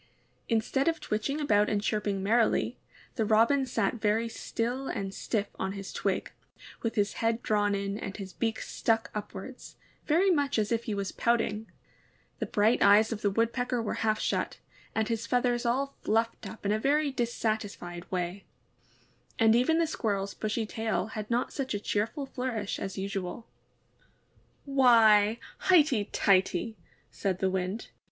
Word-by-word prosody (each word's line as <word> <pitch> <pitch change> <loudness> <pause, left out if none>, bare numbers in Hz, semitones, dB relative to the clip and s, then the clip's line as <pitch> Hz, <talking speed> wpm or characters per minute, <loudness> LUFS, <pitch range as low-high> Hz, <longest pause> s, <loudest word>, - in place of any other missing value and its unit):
Instead 235 +5 +1
of 330 -1 +1
twitching 220 +8 -2
about 210 -8 +3
and 205 - +1
chirping 205 -3 -1
merrily, 225 +3 +2 0.4
the 225 - +2
Robin 230 +6 +3
sat 225 -1 -1
very 220 +2 +2
still 240 +3 -3
and 195 -2 -3
stiff 205 0 -2
on 190 0 -2
his 195 -1 -7
twig, - - -1 0.5
with 230 0 -2
his 205 -2 +1
head 230 +1 +1
drawn 205 -1 +2
in 200 +1 -3
and 195 - -6
his 195 -2 -7
beak 225 -1 -1
stuck 225 -1 0
upwards, 210 +4 -7 0.3
very 355 +6 +4
much 285 -6 +1
as 215 0 0
if 230 0 0
he 215 - -2
was 200 -1 -2
pouting; 225 -2 0 0.7
the - - -2
bright 215 +3 +2
eyes 205 +3 +6
of 220 -2 -3
the 205 - +2
Wood 230 +3 +1
pecker 245 -1 -1
were 225 - -2
half 215 -1 +1
shut, - - -1 0.4
and 220 -1 +1
his 230 0 -2
feathers 245 -1 +1
all 275 +3 0
fluffed 225 +2 0
up 220 - -11
in 200 - +2
a 215 - +1
very 290 +4 +2
dissatisfled 215 -7 -3
way; 180 +1 -3 0.9
and 225 -1 +5
even 255 +7 +3
the 335 - +3
SquirreFs 200 -9 -2
bushy 220 +1 -2
tail 215 -4 -1
had 215 -1 -6
not 240 +1 0
such 265 -6 -2
a - - -1
cheer 210 +1 0
ful 285 +2 -6
flourish 250 -6 -3
as 195 0 -5
usual. 195 +3 -4 1.2
'Why, 230 -6 +5 0.2
highty 300 - +4
tighty!'' 195 +2 +2 0.4
said 190 -3 -1
the 190 0 0
Wind. 190 +3 -3
220 Hz, 160 wpm, -29 LUFS, 205-240 Hz, 1.2 s, eyes